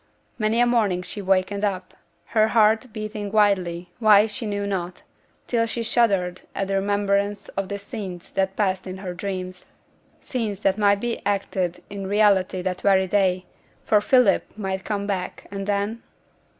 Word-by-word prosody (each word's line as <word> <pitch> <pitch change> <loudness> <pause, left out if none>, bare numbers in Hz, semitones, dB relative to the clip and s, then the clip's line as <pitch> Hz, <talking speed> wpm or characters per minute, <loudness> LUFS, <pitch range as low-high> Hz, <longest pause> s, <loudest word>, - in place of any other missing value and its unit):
Many 215 +2 +1
a 245 - +5
morning 210 -7 +1
she 205 +3 -6
wakened 195 +1 +1
up, 185 -3 -2 0.4
her 215 -1 +4
heart 220 +2 +3
beating 215 -1 -5
wildly, 185 -5 +1
why, 215 -2 +6
she 220 +1 -2
knew 205 -1 -2
not, 185 -3 -4 0.4
till 230 -2 +1
she 230 +1 -3
shuddered 200 -6 +1
at 195 - -1
the - - 0
remembrance 200 +1 0
of 195 -1 -4
the 200 - -3
scenes 200 -4 -8
that - - 0
had 190 - -28
passed 190 -2 0
in 185 0 -6
her 185 -2 -5
dreams: 185 -1 -5 0.5
scenes 215 -6 -3
that 195 +1 +1
might 200 -1 +3
be 240 -1 -2
acted 195 -3 -1
in 200 -1 -6
reality 195 -3 +2
that 185 0 -2
very 190 -1 +4
day; 185 -1 +1 0.4
for 210 -1 +4
Philip 250 +4 +4
might 190 -2 -3
come 205 -2 -2
back, 195 -3 -4
and 195 0 -5
then? 205 +3 -1
200 Hz, 165 wpm, -23 LUFS, 190-215 Hz, 0.5 s, why